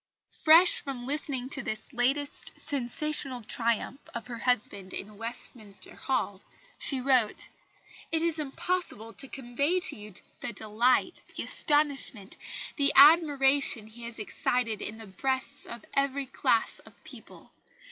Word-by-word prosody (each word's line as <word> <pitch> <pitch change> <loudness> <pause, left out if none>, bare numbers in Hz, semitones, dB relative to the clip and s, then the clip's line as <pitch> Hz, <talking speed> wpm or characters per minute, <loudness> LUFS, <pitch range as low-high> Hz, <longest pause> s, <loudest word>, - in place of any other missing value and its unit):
Fresh 330 +3 +6
from 260 -3 -6
listening 275 -2 -3
to 275 - -3
this 215 +3 -6
latest 275 +4 -1
sensational 275 -1 0
triumph 235 +4 -1
of 230 -2 -4
her 235 -2 -6
husband 205 -6 0
in 210 +2 -7
Westminster 225 -2 -5
Hall, 205 -7 -2 0.4
she 270 - +1
wrote: 255 -4 +2 0.6
"It 325 0 0
is 330 -1 0
impossible 280 - -2
to 270 - -8
convey 275 +7 -1
to - - +1
you 210 -3 -11 0.2
the 235 - -4
delight, 235 - +1
the - - -3
astonishment, 285 - +1 0.4
the 280 -1 +3
admiration 280 -5 +6
he 230 +2 -11
has 235 -1 -6
excited 225 +1 -1
in 215 - -6
the 225 - -9
breasts 260 +8 -2
of 235 -2 -8
every 275 0 0
class 260 - +1
of - - -18
people. - - -12
255 Hz, 135 wpm, -28 LUFS, 225-285 Hz, 0.6 s, Fresh